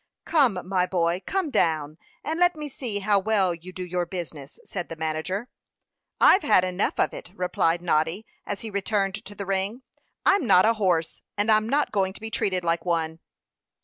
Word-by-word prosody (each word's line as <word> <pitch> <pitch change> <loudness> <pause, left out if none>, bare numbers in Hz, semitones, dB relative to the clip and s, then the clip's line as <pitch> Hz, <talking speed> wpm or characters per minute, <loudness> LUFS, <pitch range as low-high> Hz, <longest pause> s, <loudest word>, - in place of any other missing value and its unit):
"Come, 240 - +2
my 185 -1 +1
boy, 175 0 0
come 380 -6 -1
down, 155 - +1 0.2
and 320 +2 -2
let 355 -1 +4
me 300 -1 -5
see 240 -7 -4
how 205 0 +3
well 195 -3 +2
you 170 +2 -10
do 185 0 -6
your 180 0 -2
business," 165 -6 -7
said 180 -3 -5
the 165 - -5
manager. 160 +7 -3 0.7
"I've 380 - +6
had 180 - +4
enough 185 +2 -1
of - - +2
it," - - -8
replied 175 -2 0
Noddy, 165 +5 0 0.2
as 205 - -5
he 225 - -6
returned 200 0 -1
to 205 - -10
the 200 - -5
ring. 195 +6 -1 0.4
"I'm 390 -9 +3
not 185 -2 +6
a 225 - +4
horse, 180 -7 0 0.2
and 205 +2 +2
I'm 215 +1 +3
not 290 +3 +1
going 190 -2 0
to - - -11
be 220 0 -6
treated 185 -3 0
like 165 -1 0
one." 165 -2 -1
190 Hz, 190 wpm, -25 LUFS, 170-215 Hz, 0.7 s, I've